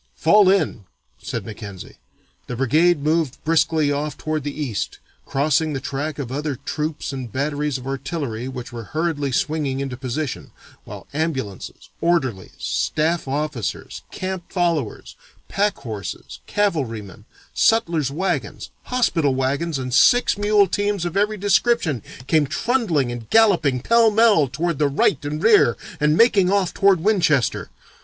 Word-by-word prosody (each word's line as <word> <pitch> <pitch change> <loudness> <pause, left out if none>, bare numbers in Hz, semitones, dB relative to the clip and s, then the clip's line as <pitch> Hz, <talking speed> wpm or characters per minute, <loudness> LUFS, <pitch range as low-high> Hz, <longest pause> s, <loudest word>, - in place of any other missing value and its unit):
'Fall 200 +4 +5
in!' 190 - +1 0.4
said - - -5
Mackenzie. 105 -4 -9 0.5
The 125 - -4
brigade 150 +5 +2
moved 155 -3 0
briskly 160 -2 +2
off 145 +1 -3
toward 155 -2 -3
the 145 +1 -5
east, 125 -9 -3 0.3
crossing 150 +2 +1
the 135 - -2
track 145 +2 -4
of 135 -4 -5
other 145 +1 -2
troops 150 +2 -4
and 130 -4 -6
batteries 145 +1 -1
of 130 - -11
artillery 135 -3 -4
which 125 -2 -7
were 115 -2 -6
hurriedly 155 -4 -1
swinging 145 -1 -1
into 135 -2 -3
position, 130 +2 -4 0.3
while - - -9
ambulances, 135 - -4
orderlies, 135 - 0
staff 160 0 -1
officers, 140 -4 -3
camp 185 -2 -5
followers, 170 - -1 0.3
pack 205 +1 0
horses, 100 - -7
cavalrymen, 115 - -2 0.3
sutler's 170 - +2
wagons, 180 +8 -3
hospital 165 - +1
wagons, 140 +4 -1
and 125 -1 -4
six 245 - +5
mule 205 0 +3
teams 205 -1 -1
of 175 - -4
every 210 +2 +1
description 200 - +1 0.2
came 155 0 +2
trundling 170 - 0
and 120 -2 -7
galloping 175 - +4
pell 230 - +4
mell 215 -8 +4
toward 160 +4 -2
the 150 - +3
right 140 +2 +1
and 150 +2 -4
rear 210 - +5 0.2
and 150 +1 +2
making 200 -6 +4
off 195 -3 +1
toward 195 -4 +3
Winchester. 170 - +1
150 Hz, 140 wpm, -21 LUFS, 130-180 Hz, 0.5 s, Fall